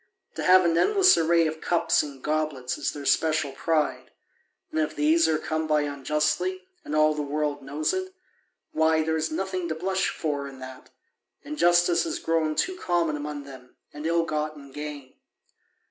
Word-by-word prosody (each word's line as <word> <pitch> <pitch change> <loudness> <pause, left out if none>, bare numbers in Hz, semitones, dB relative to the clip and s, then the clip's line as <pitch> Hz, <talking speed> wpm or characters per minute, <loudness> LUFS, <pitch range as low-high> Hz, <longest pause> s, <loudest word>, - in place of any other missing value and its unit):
To - - -5
have 185 0 +6
an 165 0 +2
endless 390 - +5
array 165 0 +3
of 155 0 -3
cups 170 -1 +2
and 140 -3 -9
goblets 150 -5 -1
is - - -2
their 145 -1 -8
special 155 -2 +1
pride: 155 +2 -1 0.6
and 160 - -1
if 155 - -1
these 160 +3 +3
are 160 -1 +2
come 155 0 -3
by 150 -1 +2
unjustly, 150 - -1 0.2
and 150 - -4
all 155 0 +4
the 150 - -3
world 145 0 -2
knows 145 +3 -2
it, 375 0 -3 0.6
why, 160 0 +2
there 160 0 0
is 160 0 -1
nothing 185 +1 -3
to 160 - -3
blush 190 +3 0
for 145 -3 -3
in 135 -1 -11
that: 130 0 -11 0.5
injustice 175 - +3
has - - -3
grown 160 -2 0
too 375 - 0
common 170 - 0
among 145 0 -5
them, 130 -2 -13 0.2
and 150 +2 -5
ill 165 0 +2
gotten 150 -3 -4
gain. 145 -2 -7
155 Hz, 175 wpm, -26 LUFS, 145-170 Hz, 0.6 s, have